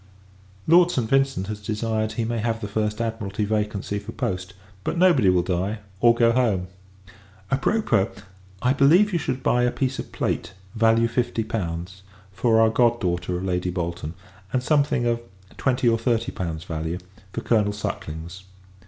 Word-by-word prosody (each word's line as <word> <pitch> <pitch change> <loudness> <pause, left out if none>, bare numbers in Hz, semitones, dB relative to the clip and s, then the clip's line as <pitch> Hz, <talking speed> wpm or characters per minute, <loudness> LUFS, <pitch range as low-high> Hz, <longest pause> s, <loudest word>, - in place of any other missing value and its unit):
Lord 170 +2 +6
St. 125 -9 -1
Vincent 135 -6 +2
has 105 +1 -6
desired 110 +1 -1
he 115 +1 -1
may 115 0 -2
have 115 +1 -1
the 105 - -4
first 105 +1 -1
Admiralty 110 -3 -2
vacancy 105 -1 -1
for 100 - -9
post; 90 0 -3 0.3
but - - -2
nobody 170 - +5
will 90 -1 +3
die, 95 +5 -1 0.2
or 120 +1 +5
go 115 0 +4
home. 110 -7 +1 0.8
A 135 - +3
propos! 135 - +2 0.6
I 125 +1 +4
believe, 170 +10 +5
you 170 - +2
should 130 -4 -3
buy 125 - +3
a 125 - +3
piece 135 -1 -2
of - - -6
plate, - - -2 0.2
value 115 +1 +3
fifty 120 -1 -1
pounds, 95 -4 -4 0.3
for 110 +4 +2
our 110 0 +5
god 120 0 +3
daughter 90 0 -1
of 90 - -5
Lady 90 -1 -1
Bolton; 85 -2 -4 0.4
and 130 -1 0
something 145 -3 +2
of 120 0 +1 0.4
twenty 125 -2 +1
or 115 -1 +3
thirty 115 +1 0
pounds 80 -3 -4
value, 80 +1 -3 0.3
for 115 - -4
Colonel 105 -4 +2
Suckling's. 85 -3 -6
110 Hz, 170 wpm, -24 LUFS, 95-120 Hz, 0.8 s, Lord